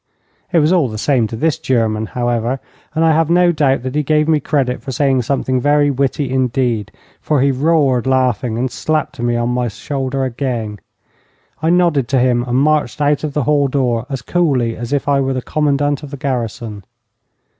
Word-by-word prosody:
It 175 - +2
was 155 +2 +4
all 170 -7 +3
the 110 - -6
same 120 -1 +1
to 115 - -6
this 155 +6 0
German, 110 -3 0
however, 120 +2 -1 0.4
and 160 +1 +2
I 160 - +5
have 160 0 +2
no 175 0 +4
doubt 140 -5 +1
that 130 0 -4
he 150 - +1
gave 150 +1 +1
me 155 -2 +3
credit 135 -3 -1
for 135 - -6
saying 135 -1 +1
something 130 0 -1
very 145 +1 +3
witty 140 +1 -1
indeed, 125 -5 0 0.3
for 150 -2 +1
he 140 +1 +3
roared 135 -3 +1
laughing, 125 -3 +1
and 125 +1 -1
slapped 155 +2 -2
me 120 0 0
on 120 0 0
my 125 0 0
shoulder 135 +3 -3
again. 120 -5 -3 0.8
I 160 - +1
nodded 170 -7 +2
to 130 +1 +1
him 120 -1 +2
and 125 +1 0
marched 150 -1 +1
out 145 0 +1
of 150 -2 -3
the 150 - 0
hall 145 0 +2
door 125 -3 -1
as 135 -3 -4
coolly 135 -10 +1
as 120 0 -6
if 145 -1 -1
I 140 -1 +3
were 135 0 0
the 130 - -2
commandant 145 -1 0
of 145 - -9
the 140 - -7
garrison. 115 -5 -4
135 Hz, 200 wpm, -17 LUFS, 120-150 Hz, 0.8 s, I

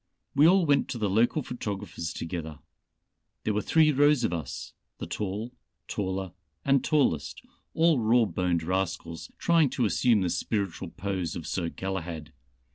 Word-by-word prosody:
We 145 +3 +6
all 185 0 +5
went 145 -2 +3
to - - -3
the 105 -4 0
local 120 +8 +2
photographers 100 -9 -5
together. 80 -2 -5 0.9
There 110 - 0
were 105 - +1
three 155 +4 +4
rows 145 -1 +4
of 90 - +1
us 80 -6 -5 0.2
the - - -5
tall, 105 +4 -4 0.4
taller 95 -2 -3 0.3
and 135 -2 +3
tallest 135 - +1 0.3
all 165 -4 +4
raw 115 +1 +4
boned 90 -5 0
rascals 85 -2 -3
trying 165 -4 +3
to 125 - 0
assume 110 0 +3
the 90 -2 0
spiritual 95 0 -2
pose 95 -3 -3
of 80 - -6
Sir 85 +1 -2
Galahad. 85 -5 -5
100 Hz, 150 wpm, -28 LUFS, 85-125 Hz, 0.9 s, We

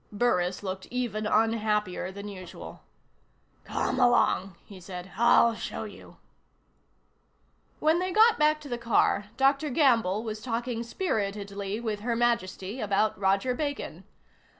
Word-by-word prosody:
Burris 195 -4 0
looked 190 -1 -5
even 230 -4 -2
unhappier 210 -4 +1
than 200 +2 -8
usual. 185 -4 -9 0.8
"Come - - -1
along," 240 -6 +3
he 195 -2 -12
said. 180 +1 -8
"I'll 235 +1 +5
show - - -5
you." - - -11 1.6
When 315 +2 +2
they 370 +1 -1
got 440 +1 +5
back 305 0 +3
to 295 - -9
the 240 -3 -4
car, 230 -3 +2
Dr. 275 +2 +2
Gamble 230 - +2
was 215 -1 -5
talking 235 0 -3
spiritedly 205 - -3
with 220 -3 -3
Her 235 +2 -1
Majesty 230 -2 -1
about 210 0 +1
Roger 195 +6 +2
Bacon. 285 +2 -4
220 Hz, 125 wpm, -28 LUFS, 200-245 Hz, 1.6 s, I'll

